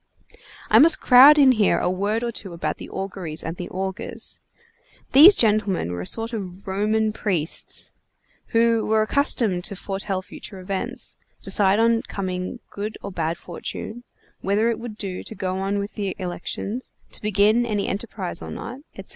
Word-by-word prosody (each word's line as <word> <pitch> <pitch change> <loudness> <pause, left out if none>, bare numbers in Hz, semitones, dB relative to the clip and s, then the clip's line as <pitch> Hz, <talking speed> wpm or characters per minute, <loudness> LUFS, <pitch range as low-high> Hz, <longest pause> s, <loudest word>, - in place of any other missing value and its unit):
I 220 - +7
must 320 +4 +9
crowd 270 +4 +8
in 275 -3 +7
here 215 -5 +3
a - - 0
word 205 +5 -1
or 235 - -1
two 195 -5 -7
about 170 - -3
the - - -9
Auguries 190 -5 -4
and 165 +2 -5
the 180 - -6
Augurs. 190 0 -5 0.7
These 330 +9 +9
gentlemen 210 - +1
were 90 0 -4
a 90 - -5
sort 225 +1 -1
of 195 -2 -7
Roman 215 +3 0
priests, 180 -8 -2 0.5
who 230 -1 +2
were 220 0 +2
accustomed 215 - +1
to 200 - -2
foretell 195 0 -3
future 195 - -10
events, 190 +1 -4 0.3
decide 200 -1 +2
on 230 0 +3
coming 185 +4 -5
good 210 +2 -5
or 200 - -5
bad 165 -2 -2
fortune, 215 +6 -7 0.4
whether 210 +4 +1
it 225 - -4
would 230 -3 -8
do 190 -4 -4
to 220 - -8
go 185 -1 -3
on 195 +1 -1
with 200 +1 -4
the 200 -3 -3
elections, 190 +6 -5 0.2
to - - -2
begin 210 +3 +3
any 210 -4 -1
enterprise 195 -4 -4
or - - -7
not, 250 +3 -7 0.2
etc. - - -10
205 Hz, 170 wpm, -23 LUFS, 185-225 Hz, 0.7 s, must